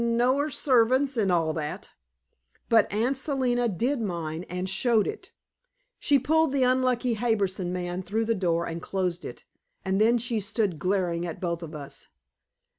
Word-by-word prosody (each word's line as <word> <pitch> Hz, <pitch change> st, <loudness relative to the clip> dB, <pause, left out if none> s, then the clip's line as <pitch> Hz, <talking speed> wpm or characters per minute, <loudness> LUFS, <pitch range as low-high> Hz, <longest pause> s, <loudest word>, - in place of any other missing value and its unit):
No 240 Hz, +3 st, +2 dB
er 295 Hz, +2 st, 0 dB
servants, 260 Hz, 0 st, +2 dB
and 205 Hz, -5 st, +1 dB
all 165 Hz, -3 st, +1 dB
that." 150 Hz, -2 st, -5 dB, 0.8 s
But 225 Hz, -2 st, +4 dB
Aunt 240 Hz, +6 st, 0 dB
Selina 255 Hz, -4 st, 0 dB
did 240 Hz, -, -1 dB
mind, 170 Hz, -4 st, -4 dB
and 180 Hz, +1 st, -3 dB
showed 215 Hz, +3 st, +2 dB
it. 430 Hz, -, -6 dB, 0.7 s
She 285 Hz, -, +3 dB
pulled 315 Hz, +3 st, +2 dB
the 270 Hz, -2 st, +2 dB
unlucky 255 Hz, -1 st, +2 dB
Harbison 200 Hz, -5 st, -1 dB
man 180 Hz, 0 st, -3 dB
through 210 Hz, +5 st, -1 dB
the 230 Hz, -, +1 dB
door 170 Hz, -4 st, 0 dB
and 165 Hz, 0 st, -5 dB
closed 180 Hz, -3 st, -2 dB
it, -, -, -9 dB, 0.4 s
and 190 Hz, +2 st, +1 dB
then 230 Hz, +2 st, +4 dB
stood 220 Hz, -, -1 dB
glaring 175 Hz, -2 st, 0 dB
at 165 Hz, -, -6 dB
both 170 Hz, -2 st, -2 dB
of 165 Hz, -2 st, -8 dB
us. 140 Hz, -2 st, -9 dB
215 Hz, 160 wpm, -26 LUFS, 175-250 Hz, 0.8 s, But